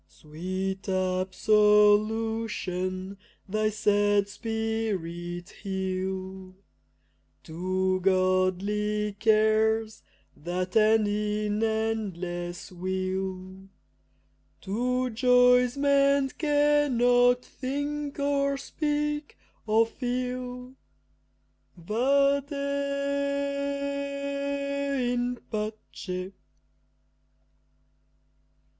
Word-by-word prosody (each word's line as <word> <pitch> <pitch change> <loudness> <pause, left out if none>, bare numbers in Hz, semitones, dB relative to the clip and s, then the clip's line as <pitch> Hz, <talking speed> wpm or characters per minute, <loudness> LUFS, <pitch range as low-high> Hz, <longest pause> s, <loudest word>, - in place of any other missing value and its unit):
Sweet 185 +5 -5
absolution 205 0 +2 0.3
thy 215 +2 0
sad 205 -1 +2
spirit 200 -6 -3
heal; 190 -1 -4 0.9
To 185 +3 -1
godly 195 +3 +1
cares 220 0 +2 0.3
that 180 +3 -4
end 220 0 +4
in 210 0 -1
endless 190 -6 -3
weal, 185 +1 -4 0.9
To 250 +5 -1
joys 250 +1 +4
man 280 -1 +3
cannot 255 -5 +3
think 285 +2 -4
or 280 -1 +1
speak 295 +1 -2 0.3
or 220 +1 +4
feel, 250 +1 -4 1.0
Vade 275 - +1 2.6
in 245 0 -1 0.2
pace! 210 -4 -5
215 Hz, 55 wpm, -27 LUFS, 185-250 Hz, 2.6 s, end